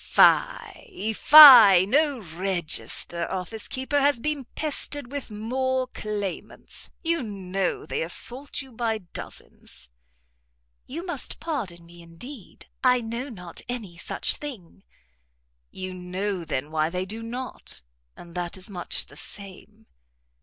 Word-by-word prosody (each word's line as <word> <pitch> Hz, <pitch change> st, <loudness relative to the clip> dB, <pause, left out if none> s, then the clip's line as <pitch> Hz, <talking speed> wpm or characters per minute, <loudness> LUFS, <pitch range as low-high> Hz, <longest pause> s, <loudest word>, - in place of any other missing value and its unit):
"Fie, 355 Hz, -, +2 dB
fie! 235 Hz, -10 st, +10 dB
no 285 Hz, +6 st, +2 dB
register 175 Hz, -2 st, -2 dB
office 190 Hz, +4 st, -4 dB
keeper 265 Hz, +2 st, -1 dB
has 285 Hz, -3 st, +3 dB
been 295 Hz, 0 st, -2 dB
pestered 290 Hz, -3 st, -4 dB
with 285 Hz, -3 st, -5 dB
more 255 Hz, +5 st, -1 dB
claimants. 205 Hz, -5 st, -6 dB
You 335 Hz, -1 st, +1 dB
know 195 Hz, -4 st, -3 dB
they -, -, -3 dB
assault 250 Hz, -, -3 dB
you 265 Hz, -, -15 dB
by 225 Hz, -1 st, -1 dB
dozens." 175 Hz, -, -10 dB, 1.0 s
"You 335 Hz, +7 st, -6 dB
must 350 Hz, -, -2 dB
pardon 200 Hz, -, -4 dB
me, 170 Hz, 0 st, -14 dB
indeed, 185 Hz, -, -11 dB, 0.2 s
I 250 Hz, -1 st, +5 dB
know 235 Hz, +4 st, -5 dB
not 180 Hz, -7 st, -6 dB
any 220 Hz, -8 st, -5 dB
such 170 Hz, -, -2 dB
thing." 210 Hz, -, -9 dB, 0.9 s
"You 185 Hz, 0 st, -6 dB
know, 185 Hz, 0 st, -4 dB
then, 145 Hz, 0 st, -3 dB
why 155 Hz, 0 st, +1 dB
they 180 Hz, +2 st, -3 dB
do 220 Hz, +4 st, -6 dB
not, 245 Hz, -, -5 dB, 0.3 s
and 170 Hz, -1 st, -12 dB
that 175 Hz, +1 st, -4 dB
is 185 Hz, +2 st, -6 dB
much 175 Hz, -3 st, -3 dB
the -, -, -17 dB
same." 210 Hz, +2 st, -8 dB
215 Hz, 125 wpm, -25 LUFS, 180-260 Hz, 1.0 s, fie